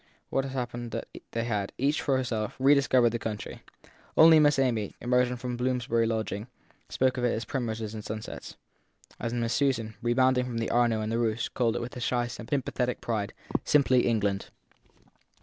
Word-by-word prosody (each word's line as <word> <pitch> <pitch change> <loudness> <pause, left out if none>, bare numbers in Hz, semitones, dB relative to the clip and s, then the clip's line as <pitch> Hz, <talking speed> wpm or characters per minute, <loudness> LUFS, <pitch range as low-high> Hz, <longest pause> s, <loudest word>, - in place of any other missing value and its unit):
What 135 - +1
had 135 - -6
happened 120 -2 -4
was - - -2
that - - -10
they 115 - -2
had, 105 -4 -2
each 140 +4 +1
for 135 -3 +1
herself, 115 -5 -2
re 135 +2 +5
discovered 130 -4 +4
the 115 - -2
country; 105 -2 -5 0.6
only 160 0 +8
Miss 145 -2 +4
Amy, 120 -6 0
emergent 125 0 +1
from 125 0 -3
Bloomsbury 120 -2 +1
lodgings, 110 -1 -2 0.4
spoke 130 0 +1
of - - -2
it 120 - +2
as 115 - -3
primroses 110 -3 -3
and 110 -1 -6
sunsets, 110 +1 -7 0.6
and 120 +1 -2
Miss 115 0 0
Susan, 115 -4 0
rebounding 125 +1 +3
from 120 -2 -4
the 115 - -1
Arno 120 -2 +2
and 110 +1 -2
the 115 - 0
Eeuss, 110 +1 -1
called 120 -2 0
it, 120 - -2
with 120 - -7
a - - -5
shy, 120 0 +1
synthetic 125 +1 -2
pride, 110 -3 -2 0.3
simply 130 -4 +3
England. 100 -4 0
120 Hz, 185 wpm, -28 LUFS, 115-130 Hz, 0.6 s, only